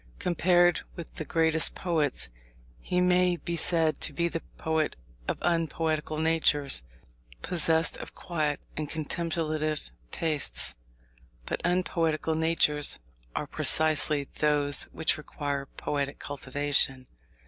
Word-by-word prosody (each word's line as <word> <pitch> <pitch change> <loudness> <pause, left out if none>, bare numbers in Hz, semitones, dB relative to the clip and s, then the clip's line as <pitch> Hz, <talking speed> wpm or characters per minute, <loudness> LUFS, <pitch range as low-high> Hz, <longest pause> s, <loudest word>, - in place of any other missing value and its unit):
Compared 175 0 +3
with 170 - -9
the 155 - -6
greatest 160 0 +2
poets, 155 - 0 0.5
he 180 - -1
may 180 0 +3
be 170 0 -4
said 165 -1 +3
to - - -3
be 170 +4 +1
the 165 -1 -4 0.2
poet 160 -1 0 0.3
of - - -1
unpoetical 160 -2 0
natures, 155 - +2 0.6
possessed 165 -2 +2
of - - -9
quiet 155 -5 -2 0.2
and 150 -1 -4
contemplative 155 - -2 0.2
tastes. 155 - +1 0.7
But - - -3
unpoetical 165 -3 0
natures 160 -2 +2 0.4
are - - -1
precisely 155 -2 +2
those 145 -1 +3
which 160 0 -1
require 140 -2 -4
poetic 140 0 -3
cultivation. 140 -1 0
160 Hz, 110 wpm, -28 LUFS, 150-165 Hz, 0.7 s, Compared